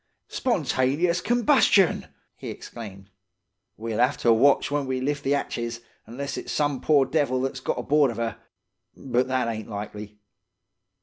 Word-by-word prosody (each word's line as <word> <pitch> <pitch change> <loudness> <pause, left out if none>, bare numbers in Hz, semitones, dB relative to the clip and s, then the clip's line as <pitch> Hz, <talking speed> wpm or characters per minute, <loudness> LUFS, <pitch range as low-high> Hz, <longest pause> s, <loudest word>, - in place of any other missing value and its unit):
"'Spontaneous 170 - 0
combustion!' 240 - +3 0.3
he - - -8
exclaimed. 100 -4 -9 0.7
'We'll 115 +1 -2
'ave 125 +3 +2
to 115 - +5
watch 140 +5 +3
when 145 -2 -1
we 130 0 -1
lift 145 +2 -2
the 140 +1 +2
'atches, 120 -4 -3 0.3
'nless 140 +5 -5
it's - - -7
some 145 -3 0
poor 145 -3 +4
devil 135 -3 0
that's 130 -1 -3
got - - -2
aboard 145 -2 +3
of 115 - -6
'er. 115 -2 -2 0.6
But 125 -1 0
that 130 -2 0
ain't 110 -2 -4
likely. 105 0 -7
130 Hz, 145 wpm, -25 LUFS, 115-145 Hz, 0.7 s, to